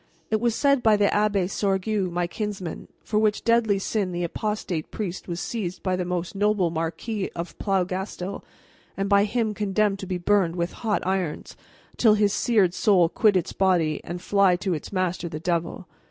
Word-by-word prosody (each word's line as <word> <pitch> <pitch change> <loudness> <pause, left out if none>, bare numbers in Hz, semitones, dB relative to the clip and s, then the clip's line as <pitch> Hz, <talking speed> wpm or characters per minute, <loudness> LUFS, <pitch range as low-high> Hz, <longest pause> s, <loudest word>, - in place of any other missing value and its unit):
And 220 - +3
it - - -9
was 235 -2 +1
said 280 -2 +3
by 220 -3 +4
the 205 - +3
Abbé 205 -3 +2
Sorgue, 195 0 0
my 175 0 0
kinsman: 195 -2 -5 0.2
for 210 - 0
which 215 -1 +1
deadly 230 -3 +3
sin 195 -1 -1
the 175 0 -2
apostate 180 -3 -3
priest 190 -4 -5
was 170 -1 -4
seized 190 -5 -4
by 185 -1 +1
the 180 - -1
most 180 -1 -3
noble 205 -3 +1
Marquis 170 +6 -3
of 170 +1 -5
Plougastel 190 0 -2 0.5
and 195 0 -1
by 200 0 +4
him 220 0 -1
condemned 205 -1 0
to 190 - -6
be 185 -1 -2
burned 180 -2 +2
with 170 0 -2
hot 220 -2 0
irons, 185 -4 -2 0.4
until 220 -3 +4
his 205 -1 +2
seared 210 -8 +2
soul 185 -5 +3
quit 205 +1 +3
its 175 - -2
body 175 -5 +1
and 175 +1 -6
fly 200 -2 +4
to 185 +1 -2
its 155 - -5
master 185 -2 -1
the 155 -1 -5
devil. 170 +1 -2
195 Hz, 185 wpm, -25 LUFS, 175-210 Hz, 0.5 s, by